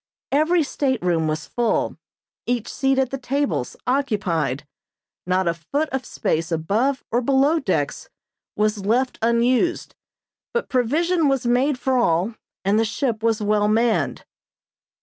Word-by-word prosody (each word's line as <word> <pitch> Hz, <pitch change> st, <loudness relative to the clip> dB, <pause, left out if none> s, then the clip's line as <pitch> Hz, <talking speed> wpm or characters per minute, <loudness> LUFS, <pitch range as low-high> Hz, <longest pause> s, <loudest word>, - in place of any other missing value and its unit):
Every 315 Hz, +4 st, +3 dB
stateroom 180 Hz, -, 0 dB
was 155 Hz, 0 st, -2 dB
full; 235 Hz, -3 st, 0 dB, 0.5 s
each 240 Hz, -2 st, -1 dB
seat 270 Hz, 0 st, +1 dB
at 265 Hz, -2 st, +1 dB
the 270 Hz, -, -3 dB
tables 270 Hz, -, -1 dB
occupied. 185 Hz, -, 0 dB, 0.6 s
Not 185 Hz, 0 st, +1 dB
a 170 Hz, -, +2 dB
foot 280 Hz, -, -2 dB
of 265 Hz, -1 st, -3 dB
space 165 Hz, -4 st, -2 dB
above 220 Hz, -, 0 dB
or 240 Hz, -, +2 dB
below 275 Hz, +5 st, +3 dB
decks 175 Hz, -, -2 dB, 0.5 s
was 210 Hz, -1 st, 0 dB
left 245 Hz, +6 st, +1 dB
unused, 240 Hz, +8 st, +1 dB, 0.6 s
but 475 Hz, -, -1 dB
provision 310 Hz, +7 st, +2 dB
was 270 Hz, -2 st, +1 dB
made 250 Hz, +3 st, +2 dB
for 260 Hz, -1 st, +1 dB
all, 180 Hz, +1 st, +1 dB, 0.3 s
and 200 Hz, +3 st, +3 dB
the -, -, +3 dB
ship 225 Hz, 0 st, -1 dB
was 225 Hz, -1 st, +1 dB
well 210 Hz, 0 st, +2 dB
manned. 225 Hz, +2 st, +1 dB
240 Hz, 135 wpm, -22 LUFS, 205-270 Hz, 0.6 s, Every